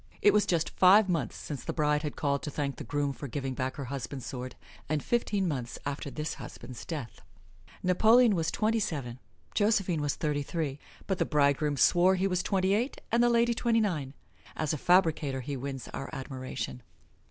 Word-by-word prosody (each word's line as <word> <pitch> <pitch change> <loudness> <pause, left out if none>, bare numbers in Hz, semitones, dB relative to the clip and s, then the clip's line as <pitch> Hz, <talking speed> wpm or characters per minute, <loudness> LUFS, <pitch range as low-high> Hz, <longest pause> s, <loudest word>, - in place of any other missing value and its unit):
It 205 - +5
was 210 -1 +3
just 165 -5 +1
five 195 +3 +6
months 160 - -1
since 140 -5 -6
the - - -3
bride 150 -1 +1
had 150 -2 -4
called 140 -1 0
to 150 - -4
thank 140 -1 -3
the - - -6
groom 145 -1 -1
for 140 - -7
giving 135 0 -3
back 130 +1 -3
her 140 - -5
husband's 130 -1 -5
sword, 130 -1 -6 0.3
and 150 -1 0
fifteen 210 -5 0
months 125 -7 -3
after 140 0 -3
this 150 +2 -4
husband's 125 - -9
death. 145 -8 -6 0.6
Napoleon 220 +6 +5
was 165 -3 0
twenty 225 +1 +1
seven; 135 - -3 0.3
Josephine 195 -6 +2
was 145 -1 0
thirty 150 -2 -1
three, 145 -2 -3 0.3
but 190 -3 -1
the - - +4
bridegroom 145 0 +2
swore 180 +6 +5
he 185 +1 0
was 180 -2 +1
twenty 190 0 +1
eight 235 +7 -1
and 235 +1 +3
the 240 - +5
lady 235 0 +3
twenty 230 0 +2
nine. 155 -11 -1 0.4
As 155 -1 -1
a - - -1
fabricator 160 -7 +2
he 140 +3 -4
wins 135 -1 -5
our 135 - -6
admiration. 130 - -5
150 Hz, 190 wpm, -29 LUFS, 140-190 Hz, 0.6 s, five